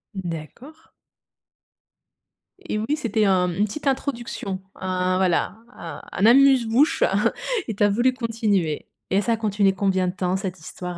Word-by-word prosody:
D'accord. 190 Hz, -, -8 dB, 1.7 s
Et 215 Hz, -, -2 dB
oui, 245 Hz, +8 st, 0 dB
c'était 225 Hz, -7 st, 0 dB
un 185 Hz, -2 st, +3 dB
une 205 Hz, +4 st, +1 dB
petite 290 Hz, +9 st, -7 dB
introduction, 240 Hz, -8 st, -2 dB, 0.2 s
un 185 Hz, 0 st, -1 dB
voilà, 185 Hz, +2 st, +1 dB, 0.2 s
a 165 Hz, -4 st, -9 dB, 0.2 s
un 200 Hz, -, +4 dB
amuse 265 Hz, 0 st, +6 dB
bouche 270 Hz, +8 st, +3 dB, 0.6 s
et 220 Hz, -, -3 dB
tu 205 Hz, -, +1 dB
as 205 Hz, -, +5 dB
voulu 240 Hz, +5 st, +2 dB
continuer 215 Hz, -, -1 dB, 0.2 s
et 195 Hz, +2 st, +3 dB
ça 230 Hz, +3 st, +1 dB
a 225 Hz, -, -1 dB
continué 205 Hz, -3 st, +1 dB
combien 190 Hz, -1 st, +1 dB
de 180 Hz, -, -2 dB
temps 185 Hz, -1 st, -1 dB
cette 190 Hz, -3 st, -5 dB
histoire 180 Hz, +2 st, -7 dB
200 Hz, 155 wpm, -23 LUFS, 185-235 Hz, 1.7 s, amuse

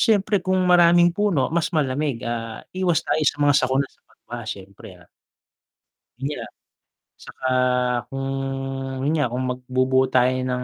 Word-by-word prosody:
Siyempre 205 Hz, -3 st, +2 dB
kung 185 Hz, +1 st, 0 dB
maraming 175 Hz, -1 st, +5 dB
puno 175 Hz, -9 st, 0 dB
mas 170 Hz, -1 st, +1 dB
malamig, 140 Hz, -4 st, -1 dB
ah, 115 Hz, -1 st, -5 dB
iwas 185 Hz, -3 st, 0 dB
tayo 155 Hz, -, 0 dB
sa -, -, -3 dB
mga 145 Hz, -1 st, +4 dB
sakuna, 135 Hz, 0 st, +2 dB
sa -, -, -32 dB
pagbaha, 120 Hz, 0 st, -10 dB
syempre, 100 Hz, 0 st, -9 dB
ah, 90 Hz, -1 st, -20 dB, 1.1 s
yun 140 Hz, +3 st, -4 dB
nga -, -, -7 dB, 0.7 s
tsaka 130 Hz, -, -7 dB, 0.6 s
kung 135 Hz, 0 st, -3 dB, 0.8 s
yun 155 Hz, -, +1 dB
nga, 145 Hz, -5 st, +1 dB
kung 125 Hz, +1 st, -2 dB
magbubuo 130 Hz, +1 st, +1 dB
tayo 130 Hz, 0 st, +3 dB
ng 125 Hz, 0 st, -2 dB
135 Hz, 145 wpm, -22 LUFS, 125-170 Hz, 1.1 s, maraming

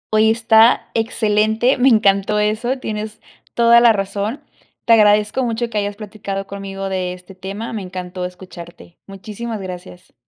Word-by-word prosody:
Oye, 215 Hz, +1 st, +4 dB
está 225 Hz, +1 st, +4 dB
excelente, 220 Hz, +2 st, +1 dB
me 260 Hz, +2 st, +5 dB
encantó 210 Hz, -2 st, +2 dB
eso, 220 Hz, +5 st, 0 dB
tienes 215 Hz, -3 st, -6 dB, 0.4 s
toda 235 Hz, 0 st, +6 dB
la 235 Hz, -1 st, +6 dB
razón. 205 Hz, +5 st, -3 dB, 0.4 s
Te 230 Hz, -, +5 dB
agradezco 210 Hz, +3 st, +3 dB
mucho 235 Hz, 0 st, -2 dB
que 210 Hz, -, -1 dB
hayas 205 Hz, 0 st, -3 dB
platicado 200 Hz, -2 st, -6 dB
conmigo 195 Hz, -1 st, -6 dB
de 185 Hz, -1 st, -3 dB
este 180 Hz, +1 st, -13 dB
tema, 195 Hz, +5 st, -7 dB
me 210 Hz, -, -4 dB
encantó 180 Hz, 0 st, -7 dB
escucharte. 180 Hz, -2 st, -12 dB
Muchísimas 210 Hz, +3 st, -7 dB
gracias. 180 Hz, -1 st, -10 dB
210 Hz, 145 wpm, -18 LUFS, 195-225 Hz, 0.4 s, toda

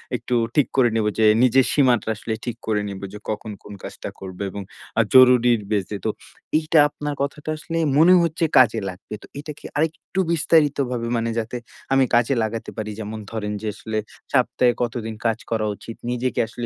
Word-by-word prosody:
একটু 125 Hz, -, -2 dB, 0.2 s
ঠিক 145 Hz, -, +4 dB
করে 130 Hz, -3 st, +4 dB
নিব 110 Hz, -1 st, +1 dB
যে 110 Hz, -, +5 dB, 0.2 s
নিজের 130 Hz, +1 st, +5 dB
সীমাটা 125 Hz, -7 st, +3 dB
আসলে 110 Hz, +2 st, -4 dB
ঠিক 120 Hz, -, -3 dB
করে 105 Hz, -2 st, +1 dB
নিব 100 Hz, -1 st, -7 dB
যে, 105 Hz, -, -8 dB
কখন 110 Hz, 0 st, -4 dB
কোন 105 Hz, -, -10 dB
কাজটা -, -, -7 dB
করব 95 Hz, -1 st, -8 dB
এবং 100 Hz, +2 st, -6 dB, 0.4 s
আ -, -, +7 dB
জরুরীর 125 Hz, -3 st, +6 dB
বেইস 100 Hz, -4 st, 0 dB
এ। -, -, -3 dB
তো -, -, +2 dB, 0.5 s
এইটা 155 Hz, 0 st, +3 dB
আপনার 150 Hz, 0 st, -4 dB
কথাটা 145 Hz, +2 st, -3 dB
আসলে 165 Hz, +2 st, -5 dB, 0.2 s
মনে 165 Hz, +4 st, +7 dB
হচ্ছে 165 Hz, 0 st, 0 dB
কাজে 115 Hz, -3 st, +5 dB
লাগবে। 90 Hz, +3 st, -10 dB
তো -, -, -13 dB
এইটাকে 150 Hz, 0 st, -8 dB
আরেকটু 160 Hz, +4 st, -2 dB
বিস্তারিতভাবে 145 Hz, -7 st, +2 dB
মানে 115 Hz, 0 st, -1 dB
যাতে 115 Hz, +2 st, -4 dB, 0.4 s
আমি 135 Hz, 0 st, +5 dB
কাজে 120 Hz, +3 st, +3 dB
লাগাতে 110 Hz, +1 st, -4 dB
পারি 105 Hz, -1 st, -3 dB
যেমন 110 Hz, 0 st, -5 dB
ধরেন 105 Hz, -2 st, -3 dB
যে, 110 Hz, -, -4 dB
আসলে 110 Hz, 0 st, -4 dB, 0.4 s
সপ্তাহে 125 Hz, -1 st, +3 dB
কতদিন 115 Hz, -2 st, -3 dB
কাজ 115 Hz, -1 st, +2 dB
করা 110 Hz, -1 st, 0 dB
উচিত? 115 Hz, +2 st, -9 dB, 0.2 s
নিজেকে 125 Hz, +1 st, -1 dB
আসলে 120 Hz, -, -6 dB
120 Hz, 185 wpm, -22 LUFS, 110-140 Hz, 0.5 s, আ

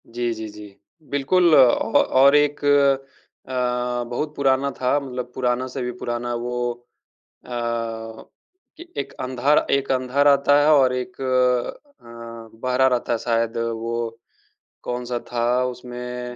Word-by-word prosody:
जी, 120 Hz, 0 st, -2 dB
जी, 110 Hz, -1 st, -6 dB
जी। 105 Hz, -1 st, -12 dB, 0.3 s
बिल्कुल 165 Hz, +5 st, +3 dB
अ, -, -, +7 dB
औ 120 Hz, -4 st, +4 dB, 0.3 s
और 140 Hz, +1 st, +7 dB
एक 145 Hz, 0 st, +2 dB
अ, 140 Hz, -2 st, 0 dB, 0.6 s
बहुत 150 Hz, +5 st, -3 dB
पुराना 135 Hz, 0 st, +2 dB
था। 130 Hz, +3 st, +2 dB
मतलब 125 Hz, -3 st, -6 dB
पुराना 125 Hz, 0 st, 0 dB
से 130 Hz, +1 st, -6 dB
भी 125 Hz, 0 st, -2 dB
पुराना 120 Hz, 0 st, -3 dB
वो 120 Hz, +1 st, -2 dB, 0.7 s
अ, -, -, -14 dB
कि 115 Hz, -, -6 dB
ए 350 Hz, 0 st, -9 dB
एक -, -, -11 dB
अंधा 130 Hz, +3 st, +1 dB
र -, -, +3 dB
एक 140 Hz, 0 st, +1 dB
अंधा 130 Hz, +1 st, 0 dB
रहता 145 Hz, 0 st, +5 dB
है 145 Hz, -, +3 dB
और 130 Hz, -3 st, +4 dB
एक 125 Hz, +9 st, -5 dB
अ, 130 Hz, -, -1 dB, 0.6 s
बहरा 130 Hz, +1 st, +2 dB
रहता 125 Hz, -2 st, 0 dB
है -, -, +1 dB
शायद 115 Hz, -1 st, -1 dB
वो 115 Hz, 0 st, -2 dB, 0.9 s
कौन-सा 125 Hz, 0 st, -3 dB
था 120 Hz, -1 st, -1 dB, 0.2 s
उसमें, 125 Hz, 0 st, -6 dB
125 Hz, 145 wpm, -22 LUFS, 120-140 Hz, 0.9 s, अ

